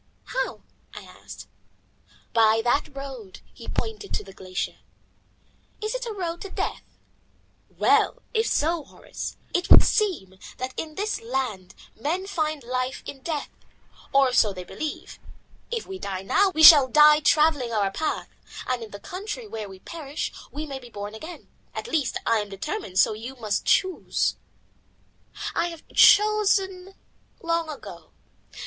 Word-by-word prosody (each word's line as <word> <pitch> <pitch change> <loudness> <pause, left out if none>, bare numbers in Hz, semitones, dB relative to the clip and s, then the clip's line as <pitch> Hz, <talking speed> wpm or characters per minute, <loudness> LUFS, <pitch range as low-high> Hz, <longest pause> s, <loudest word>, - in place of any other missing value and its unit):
"How?" - - -3 0.3
I - - -8
asked. - - -12 0.9
"By 225 -1 +4
that 275 +4 0
road," 260 -8 -8
and - - -31
he - - -12
pointed 440 -2 -4
to - - -3
the 195 -1 -13
glacier. 185 -1 -4 1.0
"It 430 0 -3
is - - -3
a - - -3
road 345 -5 -4
to 395 - -6
death!" - - -3 0.9
"Well, - - +2
if 445 0 +1
so, 325 +1 +1
Horace, - - -8 0.2
it 355 - 0
would - - +10
seem 300 - 0 0.2
that 255 +1 -4
in 310 -1 -5
this 425 +2 -2
land 230 -7 -3 0.2
men 330 - -2
find 310 -7 -2
life 255 +2 -3
in 270 - -8
death, 305 0 -4 0.6
or 270 -2 +4
so 215 -4 +4
they 185 -2 -7
believe. 305 +11 -6 0.5
If 460 -1 -3
we 380 0 -7
die 190 - -4
now, 390 - +3
we 315 -4 +1
shall 295 -5 +11
die 300 +3 +7
travelling 300 -5 +3
our 205 -3 +1
path, 315 +10 -2 0.4
and 255 -1 -1
in 225 - -7
the 200 - -9
country 420 - -6
where 220 - -6
we 190 - -11
perish 295 - -5 0.2
we 300 +2 -5
may 275 -3 -6
be 245 -2 -13
born 205 -1 -7
again. 315 +11 -9 0.3
At - - -4
least 315 - 0
I 230 - +3
am 205 -1 -4
determined, 195 - -5
so 215 - +5
you 235 +5 -7
must 215 -5 -2
choose." 375 -2 +1 1.2
"I 335 - +1
have 335 -2 -10
chosen 390 -3 +4 0.5
long 335 -1 0
ago. 300 - -9
295 Hz, 155 wpm, -25 LUFS, 225-360 Hz, 1.2 s, shall